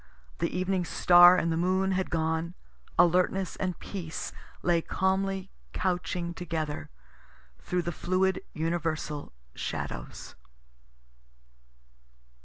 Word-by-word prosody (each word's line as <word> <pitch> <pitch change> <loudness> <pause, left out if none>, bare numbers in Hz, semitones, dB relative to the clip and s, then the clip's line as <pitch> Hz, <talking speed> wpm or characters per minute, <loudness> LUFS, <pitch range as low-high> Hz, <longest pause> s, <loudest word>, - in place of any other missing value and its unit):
The - - +1
evening 185 0 0
star 175 +1 +7
and 165 - +1
the 160 - 0
moon 190 +2 +2
had 190 0 0
gone. 160 +1 -1 0.4
Alertness 180 +2 +3
and 185 -2 -2
peace 170 -5 -6 0.3
lay 170 -1 +3
camly 190 +1 0 0.2
couching 175 -1 -1
together 160 -4 -4 0.7
through 180 -1 -1
the 170 - -2
fluid 185 +3 0
universal 160 -2 -2 0.2
shadows. - - -5
175 Hz, 95 wpm, -29 LUFS, 165-185 Hz, 0.7 s, star